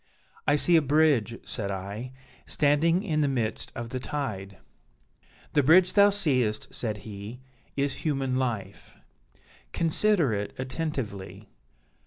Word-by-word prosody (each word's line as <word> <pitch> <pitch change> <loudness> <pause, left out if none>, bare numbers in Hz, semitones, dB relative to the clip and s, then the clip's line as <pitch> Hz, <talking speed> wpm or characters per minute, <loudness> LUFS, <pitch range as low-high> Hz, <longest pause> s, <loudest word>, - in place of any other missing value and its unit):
'I 145 - +5
see 170 +4 +3
a - - +4
bridge,' 140 -6 +2
said 105 -5 -4
I, 100 +6 -5 0.4
'standing 160 +5 +2
in 155 -7 0
the 145 - +2
midst 120 -5 -2
of 120 -2 -5
the 130 - -4
tide.' 105 -9 -4 1.0
'The 145 - +4
bridge 175 +6 +5
thou 205 0 +7
seest,' 130 - +1
said 110 -3 -3
he, 105 +3 -8 0.4
'is 140 0 0
Human 135 -4 -1
Life; 110 -7 -4 0.8
consider 170 - +2
it 100 0 -3
attentively.' 130 -8 -5
130 Hz, 125 wpm, -27 LUFS, 110-155 Hz, 1.0 s, thou